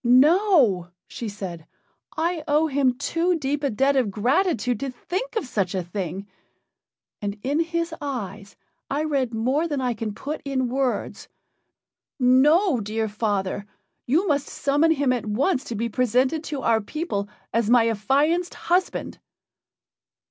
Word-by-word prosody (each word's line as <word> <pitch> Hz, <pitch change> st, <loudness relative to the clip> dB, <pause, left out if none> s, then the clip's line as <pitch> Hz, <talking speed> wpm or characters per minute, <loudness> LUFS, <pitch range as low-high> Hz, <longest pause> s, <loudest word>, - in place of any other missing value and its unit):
"No," 260 Hz, -, +4 dB, 0.2 s
she 230 Hz, -, -5 dB
said. 180 Hz, -6 st, -7 dB, 0.5 s
"I 330 Hz, 0 st, 0 dB
owe 300 Hz, +2 st, +3 dB
him 270 Hz, -4 st, +1 dB
too 340 Hz, +5 st, 0 dB
deep 290 Hz, 0 st, -2 dB
a 280 Hz, -, +2 dB
debt 270 Hz, +5 st, +2 dB
of 255 Hz, -6 st, +2 dB
gratitude 250 Hz, -, +1 dB
to 275 Hz, -, -3 dB
think 370 Hz, -, -5 dB
of 440 Hz, -, -1 dB
such 195 Hz, -7 st, -1 dB
a 185 Hz, -, -1 dB
thing. 185 Hz, +1 st, -5 dB, 1.0 s
And 205 Hz, 0 st, -3 dB
in 285 Hz, +4 st, 0 dB
his 335 Hz, 0 st, -1 dB
eyes 210 Hz, -8 st, -5 dB, 0.3 s
I 290 Hz, +2 st, 0 dB
read 275 Hz, -6 st, 0 dB
more 260 Hz, +8 st, 0 dB
than 290 Hz, -4 st, -2 dB
I 250 Hz, -2 st, 0 dB
can 220 Hz, -2 st, -5 dB
put 300 Hz, +3 st, -5 dB
in 265 Hz, -3 st, -1 dB
words. 260 Hz, 0 st, -2 dB, 0.9 s
No, 275 Hz, -, +4 dB
dear 220 Hz, +1 st, -2 dB
father! 205 Hz, -2 st, -2 dB, 0.4 s
you 325 Hz, +11 st, +2 dB
must 285 Hz, -3 st, +1 dB
summon 290 Hz, +3 st, +1 dB
him 280 Hz, -4 st, +1 dB
at 240 Hz, -3 st, -3 dB
once 260 Hz, -, +1 dB
to 235 Hz, -, -5 dB
be 230 Hz, +3 st, -1 dB
presented 255 Hz, +6 st, +1 dB
to 285 Hz, -4 st, -4 dB
our 225 Hz, -1 st, +3 dB
people 205 Hz, -5 st, -3 dB, 0.2 s
as 225 Hz, -1 st, +1 dB
my 235 Hz, -1 st, +5 dB
affianced 285 Hz, -, +1 dB
husband." 360 Hz, +2 st, -1 dB
260 Hz, 150 wpm, -24 LUFS, 220-305 Hz, 1.0 s, my